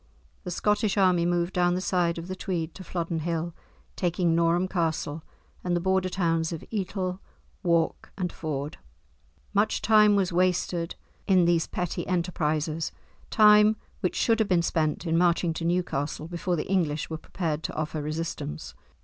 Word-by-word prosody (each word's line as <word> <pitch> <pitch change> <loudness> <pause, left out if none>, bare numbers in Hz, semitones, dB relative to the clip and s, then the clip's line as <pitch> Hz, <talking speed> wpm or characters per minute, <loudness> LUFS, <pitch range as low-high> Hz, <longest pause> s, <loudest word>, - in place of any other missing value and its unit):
The - - -3
Scottish 210 +3 +1
army 180 -3 +4
moved 175 +1 0
down 175 0 +2
the - - 0
side 175 -2 +1
of 165 +1 -6
the 185 - -4
Tweed 175 -4 -3
to 190 - -9
Flodden 170 -2 -3
Hill 165 +1 -2 0.4
taking 175 -1 +1
Norham 170 +2 +2
Castle, 160 -4 -1 0.4
and 180 -1 0
the - - +1
Border 190 +1 +1
towns 165 -3 0
of 165 - -5
Etal, 190 -3 -2 0.4
Wark, 170 -3 0
and 180 -3 -2
Ford. 150 -2 -4 0.8
Much 205 +2 +2
time 210 -1 +5
was 190 -3 +1
wasted 180 -1 0 0.3
in 185 -3 +5
these 170 -1 +2
petty 180 -2 -3
enterprises, 160 -3 -1 0.4
time 210 0 +6 0.2
which 180 - -1
should 230 -1 +2
have 220 - +1
been 175 -2 +3
spent 155 0 0
in 165 0 +2
marching 175 -1 +2
to 165 - -5
Newcastle 160 -4 -1
before 175 +1 -2
the 155 - -2
English 165 -6 0
were 160 - -2
prepared 160 -3 -3
to - - -5
offer 155 0 -2
resistance. 155 - -4
175 Hz, 160 wpm, -27 LUFS, 165-185 Hz, 0.8 s, time